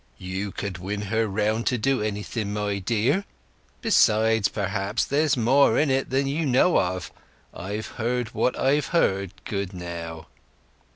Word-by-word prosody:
"You 95 +2 -4
could 95 -2 -5
win 100 +3 -4
her 110 0 +2
round 110 +3 0
to 125 - +2
do 130 +2 +1
anything, 105 0 -3
my 105 -1 -1
dear. 120 - +1 0.6
Besides, 110 - +4
perhaps 100 +1 -1
there's 145 -1 +1
more 130 +5 +4
in 150 -2 +2
it 135 0 0
than 135 +2 +1
you 145 +4 -1
know 140 +5 +4
of. 90 0 -2 0.4
I've 105 +4 -5
heard 120 0 -2
what 125 - 0
I've 135 0 +2
heard, 95 - +1
good 100 -3 -3
now." 85 -2 -6
110 Hz, 150 wpm, -25 LUFS, 100-130 Hz, 0.6 s, Besides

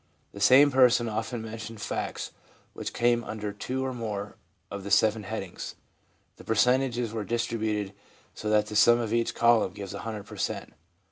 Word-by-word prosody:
The 100 - -10
same 135 +8 +7
person 125 -2 +5
often 110 +1 -3
mentioned 110 0 -7
facts - - -4 0.4
which - - -5
came 120 0 +2
under 105 -2 -5
two 130 +5 -3
or 130 - -2
more 105 -4 -5 0.4
of 100 -1 -6
the 100 - -6
seven 110 +2 +3
headings. 100 -3 -6 0.6
The - - -13
percentages 120 0 +1
were 110 -2 -2
distributed 110 -3 -2 0.4
so 105 - -4
that 105 0 +3
the 105 0 -7
sum 120 +3 +6
of 115 -2 -2
each 115 0 0
column 115 -5 +3
gives 100 -1 -7
100 105 0 -5
per - - -11
cent. - - -3
110 Hz, 165 wpm, -27 LUFS, 105-120 Hz, 0.6 s, same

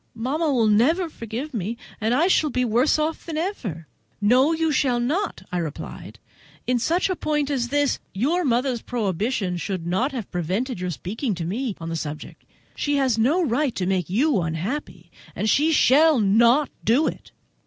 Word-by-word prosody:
Mamma 290 +7 -1
will 240 -4 +2
never 285 - +3
forgive 235 +6 -6
me, 220 +1 -3 0.2
and 225 +3 +1
I 310 +6 +3
shall 315 -4 +3
be 250 -1 0
worse 240 +7 +2
off 310 +1 -2
than 320 -2 -5
ever." 240 - -4 0.3
"No, 250 +8 +4
you 325 -1 +1
shall 260 -3 +1
not," 310 +13 -1
I 180 - -1
replied; 155 -3 -7 0.5
"in 250 0 +1
such 335 +9 +1
a 370 - -1
point 295 -3 -1
as 250 -4 0
this 285 +1 +1
your 295 - 0
mother's 250 -2 0
prohibition 200 -3 -2
ought 190 -3 -2
not 190 +10 0
to 270 - -10
have 230 -6 -5
prevented 190 - -2
your 180 0 -3
speaking 205 - -3
to 170 -1 -4
me 220 +4 -2
on 165 0 -6
the 165 - -3
subject. 155 -2 -7 0.3
She 290 0 0
has 260 -5 +1
no 300 +11 +3
right 270 0 0
to 185 - -1
make 185 -3 -1
you 240 - +2
unhappy, 170 - -4 0.2
and 215 - -1
she 300 +8 +3
shall 300 0 +5
not 235 +7 +4
do 255 +8 +3
it. - - -5
245 Hz, 185 wpm, -23 LUFS, 200-295 Hz, 0.5 s, shall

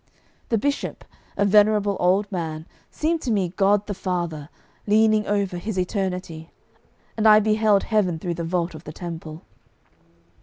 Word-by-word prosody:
The 230 - +2
bishop, 280 +6 -3 0.3
a 200 - +2
venerable 205 0 +4
old 185 +3 +3
man, 160 -4 -4 0.2
seemed 320 +1 -1
to 245 - -2
me 195 -5 +1
God 200 +3 +2
the 205 - -4
Father 175 -6 -4 0.4
leaning 215 0 +3
over 200 -3 -1
His 210 +1 -5
Eternity, 180 -4 -3 0.7
and 220 0 +2
I 215 0 +8
beheld 215 -1 +2
Heaven 200 -7 +1
through 175 +2 -3
the 170 0 -5
vault 170 +1 -1
of 155 +1 -11
the 155 - -8
temple. 165 -2 -8
195 Hz, 150 wpm, -23 LUFS, 170-215 Hz, 0.7 s, I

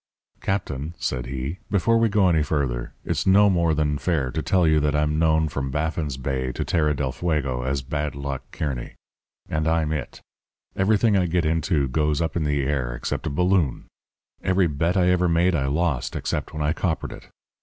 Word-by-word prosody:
"'Captain,' 80 -5 -3
said 65 -6 -2
he, 65 +7 -4
'before 115 +3 +3
we 115 -1 +3
go 100 -2 +3
any 80 -3 +3
further, 70 -6 -1
it's - - -1
no 100 +1 +6
more 85 -3 +2
than 75 -1 0
fair 75 -8 0
to - - -2
tell 90 -3 +2
you 80 -1 +4
that 75 0 +1
I'm 75 +1 +1
known 80 -1 +3
from 70 -2 -3
Baffin's 75 -1 -2
Bay 65 -1 -2
to - - -3
Terra 75 -3 +1
del 70 -2 -1
Fuego 70 -5 -1
as 65 +1 -2
"Bad 75 +1 -3
Luck" 70 -1 -4
Kearny. 65 -6 -4 0.5
And 80 0 -1
I'm 80 -1 +1
It. 75 -5 -4 0.6
Everything 105 +2 +3
I 90 -2 +2
get 85 0 +1
into 80 -2 +1
goes 75 +2 0
up 80 -2 -1
in 80 -3 0
the 75 -1 +1
air 65 -4 -1
except - - -3
a - - 0
balloon. 90 -2 +1 0.6
Every 95 0 +3
bet 85 +4 0
I 90 -1 +4
ever 90 -1 +2
made 85 +2 +3
I 70 -5 0
lost 75 -3 -1
except - - -3
when 75 -1 -3
I 75 +2 +1
coppered 80 -2 -2
it. - - -11
75 Hz, 195 wpm, -24 LUFS, 70-85 Hz, 0.6 s, no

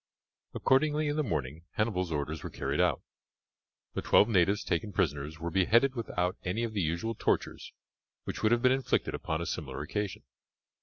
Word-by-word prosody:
Accordingly 150 +3 +2
in 145 - -1
the 155 - +1
morning 80 - -3
Hannibal's 95 -5 0
orders 75 +1 -2
were - - -5
carried - - -1
out; - - +1 0.9
the - - -2
twelve 105 - +5
natives 100 -2 +3
taken 85 +5 -1
prisoners 75 -3 -1
were 85 +1 -3
beheaded 115 +9 +4
without 90 -7 -2
any 100 +6 -1
of 115 -2 -3
the 100 - 0
usual 85 +8 -1
tortures - - -1 0.5
which - - -5
would 110 - +3
have 120 0 +3
been 125 - +6
inflicted 130 0 0
upon 80 +1 -2
a - - -2
similar 70 -8 -4
occasion. 105 +5 -3
95 Hz, 170 wpm, -30 LUFS, 80-115 Hz, 0.9 s, been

